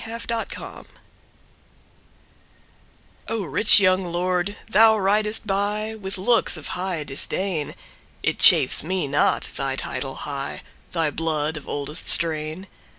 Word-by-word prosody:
Compensation 230 0 -6 2.4
O, 225 -2 -3
RICH 200 +7 +7
young 185 -1 +2
lord, 180 +3 -2
thou 220 0 +5
ridest 210 +2 +1
byWith 205 0 -3
looks 230 -2 +1
of 155 - -8
high 180 -4 -3
disdain; 155 +3 -2 0.5
It - - -1
chafes - - +6
me 180 -1 -2
not 145 +1 0
thy 135 -1 -2
title 135 0 -5
high, 140 -1 -6 0.3
Thy 165 -3 0
blood 155 0 -2
of 150 - -9
oldest 145 +3 -4
strain. 160 +2 0
185 Hz, 110 wpm, -22 LUFS, 155-210 Hz, 2.4 s, RICH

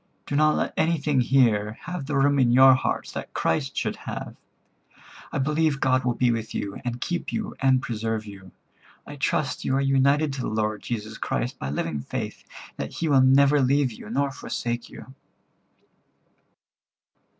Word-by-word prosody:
Do 145 - -3
not 155 +1 +4
let - - -1
anything 150 -4 +1
here 115 -5 +3
have 180 -6 -5
the 145 - -2
room 140 +1 +3
in 125 -2 +4
your 130 +2 +8
heart 130 - -1
that - - -7
Christ - - -1
should - - -1
have. - - -7 1.0
I - - -3
believe 150 +1 +1
God 130 -1 +2
will 125 -1 0
be 125 -1 +2
with 115 -1 -4
you, 100 -1 -4
and 120 -1 -3
keep 175 +7 -3
you, 220 -1 -4
and 130 -1 +3
preserve 110 -1 -3
you. 95 -3 -12 0.5
I 145 - -9
trust 145 -1 -1
you 130 - 0
are - - +2
united 140 +2 +2
to 135 - -4
the - - -2
Lord 110 -1 -1
Jesus 110 -2 -5
Christ 125 +2 -2
by 70 - -4
living 75 +1 -2
faith, - - -5 0.3
and - - -29
that - - -13
He 165 - -1
will 135 -2 +5
never 140 +2 +5
leave 135 0 +2
you, 105 - -11
nor 140 +4 0
forsake 120 -2 -4
you." 130 - -12
130 Hz, 175 wpm, -25 LUFS, 115-140 Hz, 1.0 s, your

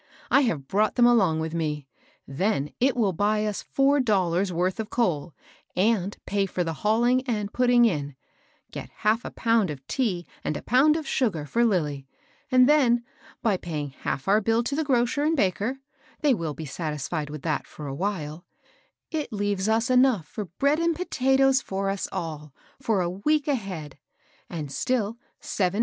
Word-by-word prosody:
I 280 - +6
have 160 - -1
brought 210 +6 +1
them 245 - +5
along 190 -10 +4
with 160 0 -3
me, 150 -4 -2 0.2
— - - -35
then 150 0 -1
it 260 0 +2
will 205 -5 +2
buy 210 +4 +1
us 210 -2 -2
four 275 +1 +2
dollars' 190 -6 +1
worth 180 +4 -1
of 220 0 -3
coal, 170 - -1 0.4
and 200 0 +1
pay 200 -1 0
for 180 -1 -1
the 165 -1 -3
hauling 240 +4 +3
and 210 -4 -2
putting 245 -1 +4
in; 145 - -1 0.6
get - - -7
half 220 +3 0
a - - -5
pound 225 -5 +1
of 135 -3 -7
tea 190 - -1 0.2
and 150 - -2
a - - -9
pound 275 +6 +4
of 315 -3 -3
sugar 190 - 0
for 235 +11 +1
Lilly; 150 - 0 0.4
and 255 0 +6
then, 250 -6 +4 0.4
by 215 -5 +2
paying 155 -5 -4
half 135 +2 -4
our 205 +2 +4
bill 225 +3 +2
to 275 +4 -2
the 315 - 0
grocer 255 0 +1
|nd 315 +2 +2
baker, 205 +4 0 0.2
— - - -30
they 290 -3 +4
will 165 -8 -3
be 160 - -6
satisfied 150 0 -4
with 150 -1 -8
that 155 -2 -1
for 150 - -9
a 135 - -4
while, 160 -2 -3 0.4
— - - -36 0.3
it 310 -3 -3
leaves 205 -1 -1
us 225 +3 +2
enough 250 - +4
for 210 - -5
bread 280 - +1
and 335 0 +1
pota 270 -7 -2
toea 270 0 +4
for 195 0 -2
ns 195 - -3
all 155 -3 -5 0.3
for 225 -7 +1
a 175 - 0
week 290 +11 0
ahead 185 - -3
•, - - -65 0.4
and 155 -5 -5
still 220 - 0
seven 230 - -16 0.3
(234) 185 -3 0
DOMESTIC - - -12
ACCX)UNTS. 205 - -2
205 Hz, 195 wpm, -26 LUFS, 165-245 Hz, 0.6 s, I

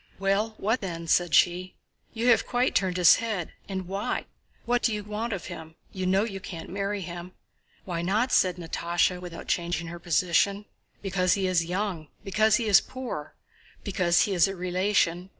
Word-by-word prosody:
"Well, 195 +3 0
what 220 +5 0
then?" 170 -4 -5
said 175 +1 +2
she. 180 +1 +2 0.4
"You 235 +2 0
have 230 - +4
quite 250 +1 +1
turned 185 -2 +1
his 180 -2 +7
head, 215 -7 -3 0.2
and 190 -2 -4
why? 195 +2 -2 0.4
What 245 0 +1
do 230 - +2
you 210 -1 -3
want 210 +3 -4
of 195 -5 -4
him? 160 0 -9 0.2
You 185 -1 -3
know 190 +2 +3
you 200 -4 -4
can't 170 -4 -8
marry 200 +1 -2
him." 175 0 -7 0.5
"Why 170 -3 -3
not?" 215 +8 +1
said 180 -2 +3
Natásha, 175 +1 -1
without 175 -2 -8
changing 170 -1 -1
her 170 +1 -8
position. 180 +4 +1 0.4
"Because 185 -2 +2
he 195 -2 0
is 180 -3 +2
young, 180 -3 -3 0.2
because 215 +2 +3
he 230 - 0
is 205 -3 +6
poor, 245 - -7 0.5
because 180 -4 +2
he 205 - +1
is 175 -1 +4
a 195 - -4
relation... 180 0 0
185 Hz, 180 wpm, -27 LUFS, 175-205 Hz, 0.5 s, his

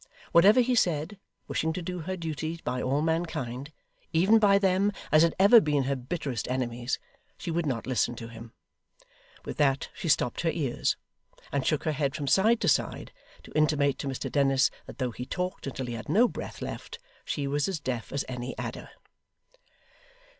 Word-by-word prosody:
Whatever 205 +9 +7
he 250 +1 +1
said, 175 -3 +1 0.3
wishing 160 0 -1
to 180 - -4
do 180 +1 -4
her 185 +3 -4
duty 160 0 -4
by 125 0 -2
all 140 +4 0
mankind, 150 -5 -2 0.4
even 190 +7 +5
by 200 -2 +5
them 195 +1 +2 0.2
as 155 - +6
had 165 0 +3
ever 205 +4 +8
been 150 -5 +1
her 140 +1 0
bitterest 130 - -4
enemies, 125 -1 -2 0.4
she 170 - -4
would 165 -1 0
not 120 -5 -2
listen 125 -1 0
to 115 - -7
him. 115 0 -11 0.9
With - - -6
that 135 -2 +2
she 170 - -4
stopped 125 -5 +2
her 165 - +1
ears, 145 -7 -1 0.5
and 140 -2 -1
shook 155 - +1
her 155 - +1
head 140 -2 -1
from 145 - -3
side 215 - +4
to - - +1
side, - - 0 0.3
to - - -14
intimate 145 -3 +2
to - - -3
Mr 135 -1 -4
Dennis 135 -2 +3 0.2
that - - -10
though 125 -3 -1
he 125 +2 -7
talked 180 -4 -3
until 130 -1 -4
he 120 - -5
had 115 +4 -7
no 220 +10 +5
breath - - -7
left, 470 - -6 0.3
she 145 - -2
was 145 +1 0
as 190 -5 -2
deaf 125 -5 -4
as 140 0 -2
any 125 0 -5
adder. - - -6
150 Hz, 185 wpm, -28 LUFS, 130-175 Hz, 0.9 s, ever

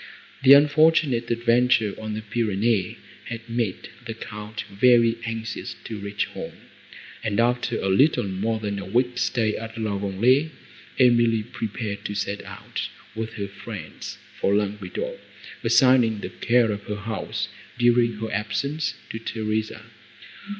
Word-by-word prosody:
The 135 0 +10
unfortunate 145 -3 +4
adventure 120 -2 +3
on 110 -1 -4
the 110 - -5
Pyrenees 105 -2 0 0.3
had 115 0 -7
made 115 -5 -2 0.2
the 115 - -4
Count 105 -1 -7
very 115 +2 +4
anxious 115 0 -4
to 110 -2 -6
reach 100 +1 -2
home, - - -8 0.7
and, 110 0 0
after 120 0 +1
little 135 +12 +4
more 105 +4 -1
than 100 -2 -3
a 100 - -6
week's 125 +4 +1
stay 110 -2 +1
at 115 0 -7
La 105 -3 -1
Vallée, 120 +10 +2 0.5
Emily 120 -3 +4
prepared 110 -3 -5
to 105 - -3
set 100 0 -2
out - - -5 0.2
with 110 0 -4
her 100 -2 -4
friends 100 - -8 0.2
for 100 - +2
Languedoc, 100 -2 -2 0.4
assigning 115 -2 +4
the 90 - -4
care 115 +5 +2
of 105 0 -5
her 105 - -3
house, 105 0 -3 0.3
during 120 -1 +4
her 110 +1 -5
absence, 140 +9 -1 0.2
to 110 - -5
Theresa. 110 -1 -3
110 Hz, 135 wpm, -24 LUFS, 105-120 Hz, 0.7 s, The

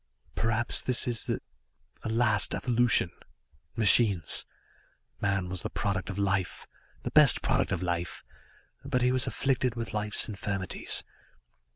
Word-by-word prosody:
"Perhaps, 115 +1 +2
this 125 -1 +2
is 120 -2 +1
a - - -9
last 110 -3 +2
evolution. 120 -7 +2 0.6
Machines 105 -6 +3 0.7
man 95 -2 0
was 90 0 -4
the - - -4
product 100 -2 -3
of 95 - -5
life, 95 -2 -1 0.4
the - - -4
best - - +5
product - - 0
of 90 - -2
life, 85 0 -3 0.6
but 130 -2 -1
he 125 - +3
was 130 -1 +3
afflicted 130 -3 -1
with 115 -1 -5
life's 105 0 0
infirmities. 100 -2 -3
105 Hz, 130 wpm, -28 LUFS, 95-120 Hz, 0.7 s, best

